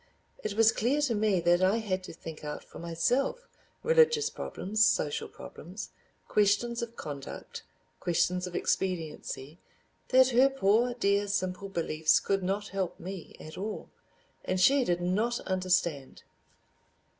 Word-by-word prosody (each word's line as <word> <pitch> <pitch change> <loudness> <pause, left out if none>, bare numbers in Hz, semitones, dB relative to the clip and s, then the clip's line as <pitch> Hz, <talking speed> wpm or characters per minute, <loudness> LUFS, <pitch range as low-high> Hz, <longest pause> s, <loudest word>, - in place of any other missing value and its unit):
It 210 -1 -3
was 225 0 +6
clear 255 +7 +1
to 275 -5 +1
me 210 -3 +2
that 175 +1 +3
I 190 +4 +3
had 195 -5 -2
to - - -9
think 160 -2 -9
out 150 0 -5
for - - -12
myself 245 - 0 0.4
religious 470 -2 +4
problems, 215 +3 -1
social 150 -9 +1
problems, 185 +6 -9 0.4
questions 210 +3 +2
of 235 0 -5
conduct, 140 -7 -7 0.4
questions 180 +1 0
of 175 - -8
expediency, 160 -4 -2 0.5
that 260 0 +5
her 260 +2 +5
poor 240 -1 +2
dear 200 -3 +1
simple 195 0 -2
beliefs 160 -4 +2
could 195 -1 0
not 200 +2 -2
help 190 -2 -3
me 185 -2 -8
at 155 +3 -9
all—and 195 -2 -7
she 275 +7 +5
did 175 -6 0
not 215 +7 0
understand! 180 -7 -1
195 Hz, 135 wpm, -29 LUFS, 175-235 Hz, 0.5 s, was